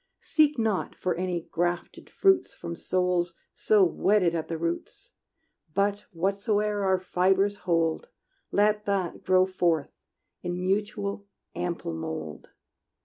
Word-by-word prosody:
Seek 300 -2 +2
not 220 -4 0
for 185 - -1
any 180 -1 -2
grafted 175 +1 -2
fruits 385 -2 +2
From 170 0 -6
souls 180 -1 0 0.2
so 210 -2 +4
wedded 185 0 +3
at 165 -2 -2
the 165 - -3
roots; 170 +1 -4 0.6
But 200 +1 +1
whatsoe'er 205 +3 0
our 190 -1 +3
fibres 190 +2 +2
hold, 165 -1 +1 0.4
Let 210 +1 +2
that 195 -3 -1
grow 185 0 +4
forth 175 -5 0 0.5
in 175 0 -3
mutual, 200 +1 -2 0.3
ample 175 - -3
mold! 80 -1 -6
185 Hz, 120 wpm, -27 LUFS, 170-205 Hz, 0.6 s, so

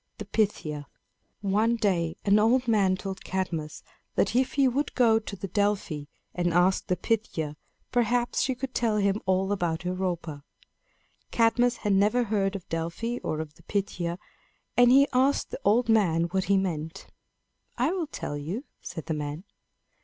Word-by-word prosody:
THE 210 - -6
PYTHIA. 165 -9 -1 0.5
One 210 +4 +2
day 175 -7 0
an 205 +1 +5
old 245 +4 +3
man 200 -5 +3
told 190 0 -6
Cadmus 170 -5 -3 0.3
that 200 - +1
if 255 +1 +2
he 275 -1 +4
would 280 +4 -1
go 225 -3 +5
to 210 -2 -7
Delphi 195 -6 -1 0.3
and 175 -1 0
ask 180 +3 +2
the 180 - +1
Pythia, 175 -8 -2 0.4
perhaps 240 0 +1
she 265 -1 0
could 260 +1 -5
tell 225 -3 +1
him 200 0 +1
all 190 +1 +2
about 175 -4 -1
Europa. 175 -5 -3 0.9
Cadmus 240 +1 +3
had 205 - +3
never 210 +5 +3
heard 200 -3 0
of 190 - -7
Delphi 170 +9 -3
or 155 -1 -2
of 155 -2 -8
the - - -21
Pythia, 175 -4 -2 0.6
and 245 0 +6
he 275 +2 +6
asked 265 +3 +2
the - - -5
old 225 +4 +3
man 190 -8 +3
what 190 0 0
he 200 0 +3
meant. 170 -2 -3 0.7
"I 255 +6 +2
will 360 -4 -2
tell 145 - -5
you," 165 - -4 0.2
said 160 -2 -7
the 160 - -2
man. 150 +2 -4
200 Hz, 160 wpm, -27 LUFS, 175-230 Hz, 0.9 s, and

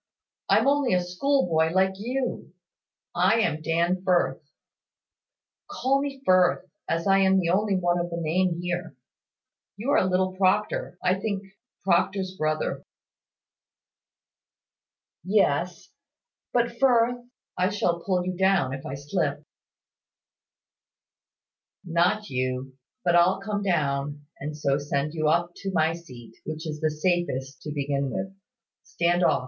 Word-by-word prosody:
I'm - - +4
only 280 -5 +2
a 180 -1 +2
schoolboy, 180 - +1
like 190 +1 +3
you. 250 +2 -3 0.6
I 190 +6 +3
am 155 -6 0
Dan 170 +3 +1
Firth. 180 -3 +1 1.3
Call 270 +3 +1
me 275 -1 -5
Firth, 185 0 +4 0.2
as 165 +1 0
I 195 0 +5
am 190 0 +4
the 170 -2 0
only 200 +2 +2
one 175 -1 +1
of 175 0 -2
the 170 - -4
name 170 +2 0
here. 175 +1 -4 0.8
You 240 +7 -2
are - - +4
little 185 0 0
Proctor, 190 -1 +1
I 185 +1 +2
think 200 -1 -2 0.4
Proctor's 190 +1 +1
brother." 155 -2 -1 2.4
"Yes: 180 -3 +1 0.6
but, 235 -1 0
Firth, 245 -2 +3 0.3
I 185 +1 +1
shall 175 -4 0
pull 180 -2 0
you 185 0 -2
down, 190 -8 +2
if 135 - -6
I 135 - -4
slip." 145 0 -2 2.4
"Not 180 +5 +1
you: 130 +1 -2 0.3
but 175 -1 +3
I'll 175 +2 +4
come 205 +1 -3
down, 145 -5 -1
and 150 +1 -5
so 140 -1 +1
send 145 +1 -2
you 155 -2 0
up 170 +2 +1
to 195 - -4
my 160 -1 +2
seat, 125 -9 -12
which 155 +1 -6
is 155 -1 -5
the 155 - +2
safest 150 -5 -1
to 150 - -6
begin 140 -1 -1
with. 190 +4 -4 0.5
Stand 175 - 0
off." - - +3
175 Hz, 130 wpm, -26 LUFS, 155-195 Hz, 2.4 s, I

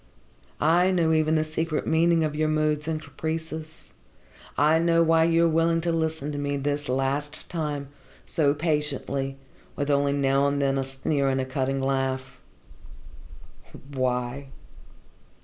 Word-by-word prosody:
I 175 +4 +4
know 170 -3 +2
even 155 0 +2
the 155 - +2
secret 155 0 -2
meaning 165 0 +3
of 150 -1 -1
your 155 0 +1
moods 155 -1 0
and 160 -1 -1
caprices. 160 0 -6 0.7
I 155 +3 +4
know 165 0 +3
why 165 0 +4
you 165 0 +3
are - - +5
willing 165 +1 +2
to 170 0 0
listen 160 -3 -1
to 145 - -4
me, 145 0 -1
this 145 0 -2
last 135 +3 -2
time, 150 -5 -3 0.4
so 145 -3 +1
patiently, 145 -3 -1 0.4
with 145 0 -1
only 140 0 +2
now 140 0 +2
and 140 0 0
then 135 -1 +1
a - - 0
sneer 135 +1 -1
and 135 0 0
a 130 - -1
cutting 135 +1 -1
laugh." 135 -1 -2 1.5
"Why?" 130 +1 -2
150 Hz, 150 wpm, -26 LUFS, 135-160 Hz, 1.5 s, are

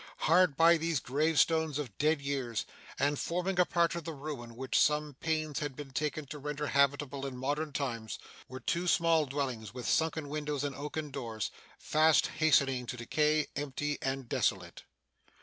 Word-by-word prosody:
Hard 170 -3 +4
by 170 +1 +6
these 165 -2 0
gravestones 155 +2 +2
of 130 -9 -5
dead 150 -1 +2
years, 130 -6 -2 0.3
and 145 0 +1
forming 180 +2 -1
a 180 - +6
part 170 -1 +2
of 170 -1 -4
the 160 0 -5
ruin 135 -5 -7
which 130 +2 0
some 150 0 +2
pains 155 -3 -1
had 145 -3 -4
been 145 -1 -8
taken 150 +2 -2
to 150 +2 -8
render 150 +1 -3
habitable 140 -1 +1
in 135 -2 -4
modern 145 +4 -2
times, 115 -6 -3 0.3
were 130 +1 -8
two 170 +5 -1
small 165 -3 +3
dwellings 130 -6 -3
with 125 - -5
sunken 160 -2 +1
windows 145 -1 -3
and 140 -2 -2
oaken 150 +1 -5
doors, 115 -6 -4 0.3
fast 155 0 +4
hastening 135 -5 +3
to 125 - -4
decay, 150 +5 +1
empty 145 +1 -2
and 135 -1 -2
desolate. - - -1
145 Hz, 165 wpm, -31 LUFS, 135-155 Hz, 0.3 s, by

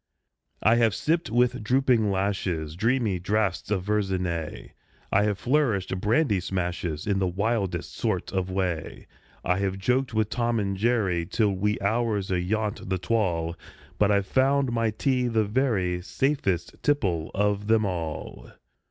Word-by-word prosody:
I 110 +2 +5
have 115 -4 +3
sipped, 165 +2 0
with 120 -1 +1
drooping 125 -2 +3
lashes, 95 -5 -1
Dreamy 115 -1 +1
draughts 100 0 -1
of 100 -3 0
Verzenay; 95 -6 -2 0.4
I 100 - +4
have 105 -2 0
flourished 115 -8 +1
brandy 110 -1 +2
smashes 90 -4 -3
In 100 -2 +1
the 95 - +1
wildest 95 -2 -1
sort 110 -7 -2
of 95 -1 -1
way; 90 -4 -3 0.4
I 90 +1 +1
have 95 -1 -1
joked 125 +6 0
with 110 0 +1
"Tom 120 -1 0
and 100 -1 -1
Jerry" 95 -6 +1
Till 105 +1 +1
wee 105 +2 0
hours 105 -1 0
ayont 100 +3 -1
the 95 - +1
twal' 90 -4 0 0.4
But 105 - +4
I've 100 -1 +2
found 135 +3 +2
my 115 -1 +1
tea 125 +3 0
the 110 -2 +1
very 100 -7 0
Safest 100 - -1
tipple 95 - 0
of 105 0 0
them 110 -1 +3
all! 80 -8 -5
100 Hz, 145 wpm, -26 LUFS, 90-115 Hz, 0.4 s, I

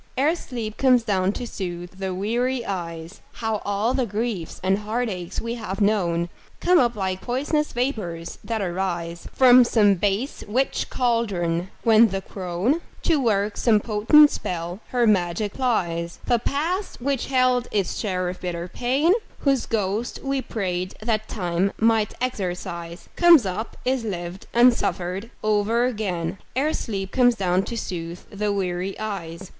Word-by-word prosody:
Ere 290 +5 +3
sleep 230 -9 -6
comes 255 -3 +4
down 195 -3 +1
to 245 - -5
soothe 180 -3 -6
the 190 -1 -2
weary 235 +6 -1
eyes, 170 -2 -5
How 220 -2 -2
all 205 +4 0
the 260 -2 0
griefs 210 -5 -3
and 190 +1 +2
heartaches 210 -5 -3
we 230 0 -3
have 210 -5 -5
known 175 -5 +1 0.3
Come 360 -1 +4
up 240 -3 +2
like 190 -2 -2
pois'nous 290 +5 0
vapors 195 -10 -3
that 225 -3 -2
arise 175 -2 -3
From 255 -1 +7
some 215 -4 +4
base 205 +7 -1
witch's 255 +6 0
caldron, 190 -8 0
when 225 0 +6
the 195 -1 -3
crone, 190 - -1 0.2
To 320 -3 +3
work 210 -3 +1
some 220 -3 +4
potent 235 +9 +5
spell, 175 +1 -4
her 245 -1 +1
magic 195 -1 +1
plies. 170 -9 -1
The 240 -1 +2
past 335 - -2
which 270 0 -1
held 255 -2 +2
its 195 -5 0
share 185 -4 -1
of 180 +1 -5
bitter 175 -1 -3
pain, 260 - +2 0.3
Whose 275 -3 +1
ghost 215 +2 -1
we 275 -1 0
prayed 185 -6 -3
that 220 -1 0
Time 180 -1 -1
might 220 -2 +2
exorcise, 180 -7 -4
Comes 340 - +7
up, 190 +4 -4
is 255 -1 +1
lived 180 -3 -5
and 240 +1 +6
suffered 190 0 -3
o'er 215 +3 +2
again, 190 -7 -2 0.2
Ere 290 +4 +1
sleep 195 -3 -3
comes 245 -2 +4
down 185 -2 +1
to 235 - -5
soothe 170 -4 -5
the 210 0 -1
weary 185 -1 -2
eyes. 190 -4 -5
210 Hz, 150 wpm, -24 LUFS, 180-245 Hz, 0.3 s, From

